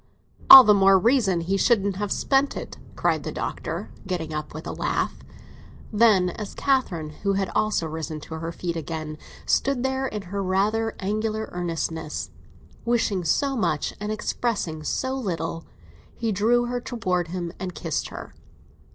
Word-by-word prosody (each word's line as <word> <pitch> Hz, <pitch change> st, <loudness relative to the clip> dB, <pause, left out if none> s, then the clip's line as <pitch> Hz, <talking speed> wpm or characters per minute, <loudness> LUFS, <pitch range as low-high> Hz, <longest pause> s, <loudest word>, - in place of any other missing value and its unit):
"All 265 Hz, -, +14 dB
the 210 Hz, -, +6 dB
more 195 Hz, -1 st, +6 dB
reason 200 Hz, -4 st, +2 dB
he 190 Hz, +4 st, 0 dB
shouldn't 200 Hz, -3 st, +2 dB
have 205 Hz, -1 st, -3 dB
spent 275 Hz, +1 st, +1 dB
it," -, -, -8 dB, 0.2 s
cried -, -, +1 dB
the -, -, -5 dB
Doctor, -, -, -4 dB, 0.2 s
getting 170 Hz, -4 st, -3 dB
up, 150 Hz, 0 st, -4 dB
with 155 Hz, +2 st, -8 dB
a -, -, -4 dB
laugh. -, -, -1 dB, 0.8 s
Then 205 Hz, -5 st, +4 dB
as 210 Hz, +1 st, -7 dB
Catherine, 195 Hz, -, 0 dB
who 200 Hz, -1 st, +1 dB
had 195 Hz, -1 st, -1 dB
also 215 Hz, -5 st, +1 dB
risen 160 Hz, 0 st, -5 dB
to 160 Hz, -, -9 dB
her 165 Hz, +1 st, -4 dB
feet 170 Hz, 0 st, -4 dB
again, 155 Hz, -1 st, -5 dB, 0.3 s
stood 270 Hz, -2 st, +1 dB
there 265 Hz, 0 st, 0 dB
in 210 Hz, -5 st, -5 dB
her 200 Hz, +2 st, -4 dB
rather 210 Hz, +4 st, 0 dB
angular 215 Hz, +2 st, -2 dB
earnestness, 165 Hz, -3 st, -3 dB, 0.5 s
wishing 225 Hz, -6 st, +1 dB
so 275 Hz, -, +1 dB
much 155 Hz, -, 0 dB
and 210 Hz, +1 st, -3 dB
expressing 210 Hz, -7 st, -2 dB
so 260 Hz, +11 st, -1 dB
little, 165 Hz, -, -3 dB, 0.5 s
he 230 Hz, -2 st, -1 dB
drew 230 Hz, +5 st, +2 dB
her 245 Hz, 0 st, -3 dB
towards 185 Hz, -9 st, -2 dB
him 175 Hz, -1 st, -4 dB
and 185 Hz, -2 st, -5 dB
kissed 165 Hz, -4 st, -2 dB
her. -, -, -9 dB
195 Hz, 160 wpm, -24 LUFS, 165-225 Hz, 0.8 s, All